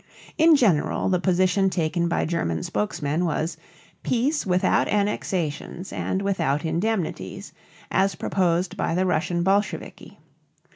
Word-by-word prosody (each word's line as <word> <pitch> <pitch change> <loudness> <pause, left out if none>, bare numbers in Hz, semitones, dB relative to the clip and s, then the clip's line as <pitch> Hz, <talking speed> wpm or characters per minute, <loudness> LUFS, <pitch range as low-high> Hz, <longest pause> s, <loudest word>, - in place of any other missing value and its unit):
In 320 0 +6
general 195 - +2
the 180 -1 +2
position 185 +1 +2
taken 170 -1 0
by 170 - 0
German 85 - -1
spokesmen 170 -6 -1
was 160 -1 -1 0.5
"peace 265 +2 0
without 180 0 +2
annexations 185 -4 -2
and 190 +1 -2
without 150 -7 0
indemnities," 165 - -2 0.4
as 195 +1 +2
proposed 180 -1 0
by 165 - -1
the 185 +1 +1
Russian 175 0 0
Bolsheviki. 200 +3 -1
180 Hz, 115 wpm, -24 LUFS, 165-195 Hz, 0.5 s, In